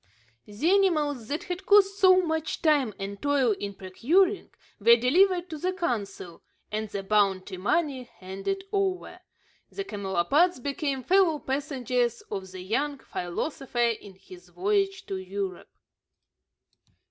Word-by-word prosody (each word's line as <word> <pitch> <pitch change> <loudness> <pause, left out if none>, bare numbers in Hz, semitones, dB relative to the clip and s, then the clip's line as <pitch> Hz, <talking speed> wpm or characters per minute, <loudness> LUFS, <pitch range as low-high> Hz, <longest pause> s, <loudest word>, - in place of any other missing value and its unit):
The 210 +10 -3
animals 305 - +2
that 295 +5 -3
had 370 +1 -6
cost 400 -1 +5
so 370 -1 +6
much 320 -1 -2
time 285 - +3
and 200 0 -6
toil 285 -4 +2
in 200 -1 -5
procuring 335 - +1 0.3
were 230 +3 +7
delivered 350 +9 +3
to 310 - -5
the 370 +4 -1
consul, 205 - -4 0.3
and 215 0 -3
the 200 -1 -4
bounty 195 -2 +1
money 260 - 0
handed 195 - -4
over. 380 -3 -2 0.5
The 395 - -5
camelopards 205 - +1
became 280 0 -3
fellow 365 -3 +3
passengers 260 -4 -1
of 190 -2 -5
the 185 0 -9
young 275 +10 -1
philosopher 245 - -5
in 205 -4 -6
his 180 -1 -15
voyage 390 - 0
to 195 - -4
Europe. 190 -1 -5
270 Hz, 130 wpm, -27 LUFS, -, 0.5 s, were